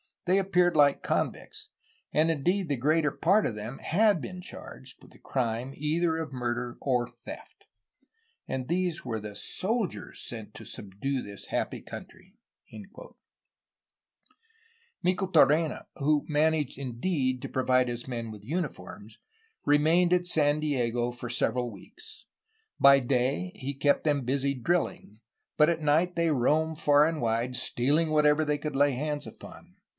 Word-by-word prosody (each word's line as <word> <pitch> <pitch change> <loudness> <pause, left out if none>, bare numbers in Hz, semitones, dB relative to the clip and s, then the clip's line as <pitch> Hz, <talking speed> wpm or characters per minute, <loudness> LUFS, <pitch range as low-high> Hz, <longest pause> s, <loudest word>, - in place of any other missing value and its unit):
They 185 +2 +3
appeared 180 -3 +2
like 145 -2 +4
convicts, - - -3 0.4
and 160 +2 +3
indeed 175 +4 0
the 140 - +1
greater 150 +4 +2
part 195 +9 +2
of - - -1
them 110 +5 -6
had 200 0 +2
been 185 +3 -7
charged 130 -6 -10
with - - -17
the - - -19
crime 125 0 -2
either 160 +2 0
of 160 -2 -4
murder 120 -1 -3
or 125 -3 0
theft. - - -12 0.8
And 130 -1 -3
these 175 0 -1
were 115 -3 -2
the 105 -1 -8
soldiers 195 - -2
sent 110 -3 -8
to - - -10
subdue 110 +7 -4
this 100 -1 -9
happy - - -2
country." - - -11 2.7
Micheltorena, 170 -4 +3
who 150 +1 +1
managed 150 -2 +1
indeed 130 0 -1
to - - -5
provide 130 -1 +2
his 120 +1 -5
men 115 -3 -4
with 105 -2 -11
uniforms, 165 - -5 0.5
remained 160 +5 +4
at 180 0 +2
San 150 -3 +3
Diego 120 -5 0
for 120 0 -7
several 125 0 0
weeks. 435 - -13 0.5
By 140 0 +7
day 130 +8 0
he 140 -5 -4
kept 140 +1 +2
them 145 -3 +1
busy 140 +2 0
drilling, 130 -6 -2 0.4
but 150 +1 +5
at 165 -1 -1
night 160 +4 +2
they 170 -1 +2
roamed 155 +4 +1
far 145 0 +5
and 160 -2 -1
wide, 115 +2 0
stealing 140 +6 +2
whatever 150 0 +4
they 150 0 0
could 150 -1 -5
lay 145 0 +3
hands 145 +2 -3
upon. 180 +1 -13
145 Hz, 145 wpm, -28 LUFS, 125-165 Hz, 2.7 s, By